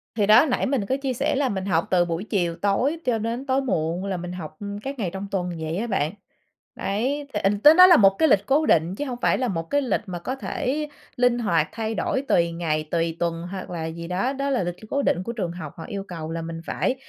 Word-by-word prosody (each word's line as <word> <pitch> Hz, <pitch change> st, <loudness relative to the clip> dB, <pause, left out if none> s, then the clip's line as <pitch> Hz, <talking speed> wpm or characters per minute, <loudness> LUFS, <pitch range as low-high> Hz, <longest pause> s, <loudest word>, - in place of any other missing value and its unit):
Thì 205 Hz, -3 st, +2 dB
đó, 220 Hz, +6 st, +7 dB
nãy 255 Hz, -, 0 dB
mình 260 Hz, -7 st, 0 dB
có 260 Hz, -, 0 dB
chia 265 Hz, -2 st, 0 dB
sẻ 240 Hz, -, 0 dB
là 270 Hz, -1 st, +2 dB
mình 190 Hz, -3 st, -3 dB
học 165 Hz, -4 st, +1 dB
từ 180 Hz, -2 st, +4 dB
buổi 170 Hz, +2 st, -3 dB
chiều 175 Hz, -6 st, -1 dB
tối 250 Hz, +11 st, +1 dB
cho 240 Hz, -3 st, +1 dB
đến 230 Hz, +5 st, -3 dB
tối 270 Hz, 0 st, +1 dB
muộn 175 Hz, -5 st, -1 dB
là 195 Hz, -1 st, -2 dB
mình 175 Hz, 0 st, -6 dB
học, 155 Hz, -4 st, -7 dB
ừm, 205 Hz, 0 st, -5 dB
các 275 Hz, +4 st, -6 dB
ngày 190 Hz, -6 st, -1 dB
trong 195 Hz, +1 st, -5 dB
tuần 180 Hz, -2 st, -1 dB
vậy 160 Hz, +2 st, -3 dB
á 225 Hz, -, -1 dB
bạn, 190 Hz, -8 st, 0 dB, 0.6 s
đấy, 270 Hz, +8 st, -2 dB
thì 210 Hz, -, 0 dB
ình 200 Hz, +1 st, +1 dB
tới 300 Hz, +7 st, +8 dB
đó 365 Hz, +2 st, +10 dB
là 355 Hz, -2 st, +8 dB
một 195 Hz, -6 st, +7 dB
cái 320 Hz, -, +4 dB
lịch 200 Hz, 0 st, +3 dB
cố 295 Hz, +5 st, +3 dB
định 165 Hz, +3 st, +3 dB
chứ 290 Hz, -, -2 dB
hông 250 Hz, -4 st, -5 dB
phải -, -, +3 dB
là 255 Hz, -2 st, 0 dB
một 165 Hz, -4 st, -2 dB
cái 285 Hz, -, +3 dB
lịch 260 Hz, -, 0 dB
mà 180 Hz, -2 st, -5 dB
có 255 Hz, +10 st, -4 dB
thể 290 Hz, +3 st, -2 dB, 0.3 s
linh 245 Hz, -1 st, +3 dB
hoạt 170 Hz, -9 st, +1 dB
thay 225 Hz, -1 st, -3 dB
đổi 265 Hz, -, -1 dB
tùy 170 Hz, -1 st, +3 dB
ngày, 155 Hz, -2 st, -1 dB
tùy 165 Hz, -1 st, 0 dB
tuần 170 Hz, -1 st, -1 dB
hoặc 190 Hz, -2 st, -6 dB
là 165 Hz, -2 st, -4 dB
gì 170 Hz, +1 st, -6 dB
đó, 195 Hz, +9 st, 0 dB
đó 275 Hz, 0 st, -2 dB
là 255 Hz, -7 st, +1 dB
lịch 175 Hz, 0 st, -3 dB
c 215 Hz, +3 st, -15 dB
cố 280 Hz, -, +1 dB
định 180 Hz, -, +1 dB
của 230 Hz, -, -4 dB
trường 190 Hz, -8 st, -3 dB
học, 160 Hz, -4 st, -7 dB
họ 165 Hz, -, -8 dB
yêu 200 Hz, -1 st, -5 dB
cầu 160 Hz, -3 st, -6 dB
là 165 Hz, 0 st, -3 dB
mình 165 Hz, 0 st, -6 dB
phải 260 Hz, -, 0 dB
200 Hz, 270 wpm, -24 LUFS, 170-255 Hz, 0.6 s, đó